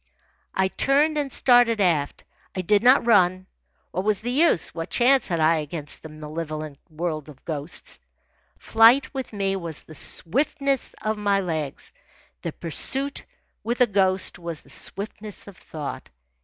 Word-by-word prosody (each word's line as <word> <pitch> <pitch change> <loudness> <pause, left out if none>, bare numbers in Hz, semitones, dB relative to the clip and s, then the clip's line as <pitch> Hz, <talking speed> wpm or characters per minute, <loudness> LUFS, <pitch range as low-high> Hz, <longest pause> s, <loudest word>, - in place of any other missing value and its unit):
I 190 0 +3
turned 290 +8 +2
and 280 -2 -2
started 245 -3 +4
aft. 165 -7 +1 0.3
I 185 - -1
did 200 +3 +3
not 250 +1 +5
run. 185 -5 +4 0.5
What 185 - -2
was 210 -1 +1
the 240 +2 -3
use? 290 - +2
What 165 +1 -5
chance 260 +2 +4
had 170 -3 -1
I 160 +1 +4
against 150 -1 -4
the 160 - -9
malevolent 155 -1 -6
world 155 -2 -4
of 135 -3 -15
ghosts? 150 0 -5 0.6
Flight, 240 +5 +5
with 265 -2 -5
me, 195 -2 -1
was 170 -5 -5
the 155 - -13
swiftness 275 - -1
of 215 0 -1
my 200 -1 +2
legs. 160 -7 -4 0.5
The - - -3
pursuit, 270 - -1 0.4
with 235 +2 -2
a 250 - +7
ghost, 190 -4 +1
was 170 -2 -4
the - - -16
swiftness 210 +1 -5
of 200 - -12
thought. 150 -5 -7
190 Hz, 155 wpm, -24 LUFS, 160-240 Hz, 0.6 s, a